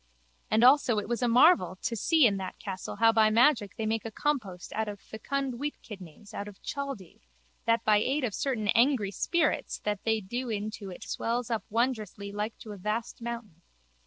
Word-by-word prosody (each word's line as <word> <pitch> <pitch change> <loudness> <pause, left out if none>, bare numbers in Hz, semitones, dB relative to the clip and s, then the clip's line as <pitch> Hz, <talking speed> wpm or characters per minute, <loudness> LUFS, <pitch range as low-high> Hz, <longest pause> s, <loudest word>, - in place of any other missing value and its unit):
And 220 +2 +3
also 255 -3 +5
it 210 - -2
was 240 +2 -2
a 245 - +2
marvel 235 - +5
to 235 - -1
see 310 - +4
in 200 -4 +3
that 190 -1 -6
castle 190 -2 -6
how 225 +2 +5
by 220 -1 +4
magic 225 -2 +3
they 220 - -2
make 220 0 -1
a 225 - -4
compost 220 -8 -3
out 220 0 -1
of 205 -1 -6
fecund 270 +6 -3
wheatkidneys 210 - -8
out 200 - -5
of 205 -2 -11
Chaldee 275 - -6 0.4
that 230 0 +2
by 215 -1 +5
aid 265 +7 0
of 230 -5 -1
certain 225 -6 -1
angry 235 -4 +3
spirits 330 - 0
that 210 -2 -2
they 220 -1 +1
do 240 +5 -4
in 215 -1 -2
to 205 -3 -8
it 180 - -9
swells 235 +1 -2
up 225 - -1
wondrously 215 -4 -1
like 210 +2 -4
to 215 - -10
a 205 - -7
vast 215 +5 -3
mountain. 230 -8 -6
220 Hz, 195 wpm, -29 LUFS, 205-245 Hz, 0.4 s, also